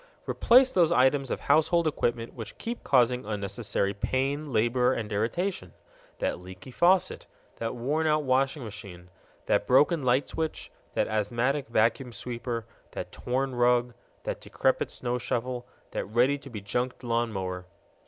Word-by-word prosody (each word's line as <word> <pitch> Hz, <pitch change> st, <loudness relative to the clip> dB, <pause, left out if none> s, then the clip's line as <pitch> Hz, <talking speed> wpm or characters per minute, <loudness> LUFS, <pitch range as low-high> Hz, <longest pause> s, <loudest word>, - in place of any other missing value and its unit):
Replace 255 Hz, +2 st, +5 dB
those 170 Hz, -3 st, +3 dB
items 135 Hz, -2 st, +3 dB
of -, -, -3 dB
household 160 Hz, +3 st, +3 dB
equipment 120 Hz, -6 st, -1 dB
which 115 Hz, -4 st, -8 dB
keep 235 Hz, +1 st, -5 dB
causing 125 Hz, -1 st, +3 dB
unnecessary 100 Hz, -1 st, -2 dB
pain, 135 Hz, +7 st, -1 dB
labor, 125 Hz, +3 st, +2 dB
and 110 Hz, -3 st, -4 dB
irritation: 115 Hz, -, -2 dB, 0.4 s
that -, -, -1 dB
leaky 95 Hz, +6 st, -11 dB
faucet, 180 Hz, +6 st, +2 dB, 0.3 s
that 115 Hz, 0 st, -3 dB
worn 150 Hz, +7 st, 0 dB
out 155 Hz, 0 st, +2 dB
washing 135 Hz, +1 st, +1 dB
machine, 100 Hz, -5 st, -9 dB, 0.3 s
that -, -, +1 dB
broken 145 Hz, +5 st, +4 dB
light 130 Hz, +1 st, +2 dB
switch, 160 Hz, -1 st, -4 dB, 0.2 s
that -, -, +2 dB
asthmatic 120 Hz, +6 st, 0 dB
vacuum 115 Hz, +3 st, +1 dB
sweeper, 120 Hz, -1 st, -4 dB, 0.3 s
that -, -, -6 dB
torn 130 Hz, +2 st, -2 dB
rug, 120 Hz, 0 st, +2 dB, 0.3 s
that -, -, -4 dB
decrepit -, -, 0 dB
snow 125 Hz, 0 st, -3 dB
shovel, 125 Hz, 0 st, -3 dB, 0.2 s
that -, -, -3 dB
ready 125 Hz, +7 st, +2 dB
to 140 Hz, -, -11 dB
be 110 Hz, -5 st, -7 dB
junked 120 Hz, +6 st, -3 dB
lawn 120 Hz, -1 st, 0 dB
mower. 90 Hz, -2 st, -4 dB
125 Hz, 145 wpm, -28 LUFS, 115-140 Hz, 0.4 s, Replace